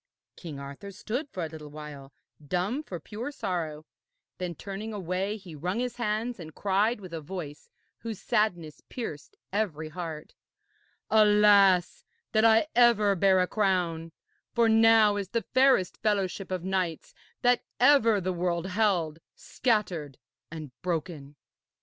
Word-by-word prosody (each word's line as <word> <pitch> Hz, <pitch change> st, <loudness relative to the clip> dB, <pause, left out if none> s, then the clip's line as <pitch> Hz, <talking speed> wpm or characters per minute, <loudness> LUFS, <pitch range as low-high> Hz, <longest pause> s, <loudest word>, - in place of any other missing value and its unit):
King 160 Hz, -5 st, -8 dB
Arthur 140 Hz, +8 st, -8 dB
stood 235 Hz, +8 st, -4 dB
for 180 Hz, -, -5 dB
a -, -, -4 dB
little 155 Hz, -1 st, -10 dB
while 145 Hz, -2 st, -10 dB, 0.3 s
dumb 185 Hz, -, -1 dB
for 185 Hz, -, -7 dB
pure 225 Hz, -, -6 dB
sorrow; 160 Hz, -, -4 dB, 0.5 s
then, 180 Hz, -2 st, -4 dB
turning 205 Hz, +4 st, -6 dB
away, 190 Hz, +2 st, -2 dB
he 185 Hz, -5 st, -12 dB
wrung 180 Hz, +7 st, -3 dB
his 245 Hz, -1 st, -3 dB
hands 230 Hz, 0 st, -2 dB
and 160 Hz, -3 st, -10 dB
cried 205 Hz, +4 st, +1 dB
with 185 Hz, -4 st, -10 dB
a 165 Hz, -, -4 dB
voice 150 Hz, -3 st, -8 dB, 0.3 s
whose 225 Hz, -4 st, -6 dB
sadness 175 Hz, -9 st, -1 dB
pierced 155 Hz, -, -7 dB, 0.2 s
every 165 Hz, -7 st, -1 dB
heart: 160 Hz, -2 st, -7 dB, 0.8 s
'Alas, 205 Hz, -4 st, +5 dB, 0.3 s
that 225 Hz, +4 st, +4 dB
ever 235 Hz, -4 st, +5 dB
I -, -, +4 dB
bare 190 Hz, 0 st, +4 dB
a 180 Hz, -, +1 dB
crown, 180 Hz, -6 st, 0 dB, 0.4 s
for 235 Hz, -1 st, +4 dB
now 225 Hz, -2 st, +5 dB
is 200 Hz, -2 st, -4 dB
the 230 Hz, -3 st, -2 dB
fairest 260 Hz, -8 st, +4 dB
fellowship 200 Hz, -3 st, -1 dB
of 185 Hz, -2 st, -3 dB
knights 185 Hz, -4 st, -2 dB, 0.3 s
that 245 Hz, 0 st, +4 dB, 0.2 s
ever 245 Hz, -5 st, +5 dB
the 185 Hz, 0 st, -2 dB
world 175 Hz, 0 st, -1 dB
held, 180 Hz, -6 st, +1 dB, 0.2 s
scattered 180 Hz, -, -1 dB, 0.3 s
and 155 Hz, -4 st, -8 dB
broken.' 160 Hz, -5 st, -4 dB
190 Hz, 140 wpm, -28 LUFS, 165-215 Hz, 0.8 s, Alas